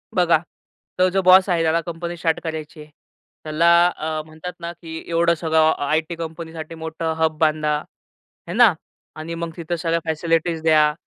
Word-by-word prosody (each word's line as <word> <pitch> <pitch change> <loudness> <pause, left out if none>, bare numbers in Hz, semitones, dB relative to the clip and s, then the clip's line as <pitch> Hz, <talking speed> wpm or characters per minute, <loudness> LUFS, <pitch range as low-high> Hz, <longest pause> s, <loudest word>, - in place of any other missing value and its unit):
बघा 175 -3 +4 0.6
तो 185 0 +4
जो 190 +1 +1
बॉस 185 +1 +6
आहे 170 -2 +2
त्याला 165 +1 +2
कंपनी 170 +1 -6
स्टार्ट 165 -1 0
करायचीय, 155 -1 -6 0.6
त्याला 160 +2 +3 0.3
अ, 155 0 -3
म्हणतात 160 +3 -8
ना, 170 0 -5
की 160 -1 -7
एवढं 170 0 +2
सगळं 160 -1 +3
अ, - - -3
आयटी 160 +2 0
कंपनीसाठी 165 -1 -7
मोठं 160 0 -4
हब 160 -1 +1
बांधा, 155 -1 +2 0.7
हे 170 - -5
ना? 230 -4 +6 0.4
आणि 160 +2 -6
मग 165 0 -4
तिथं 170 +1 -3
सगळ्या 165 0 -1
फॅसिलिटीज 165 +1 0
द्या 155 -2 +4
165 Hz, 165 wpm, -21 LUFS, 155-170 Hz, 0.7 s, बॉस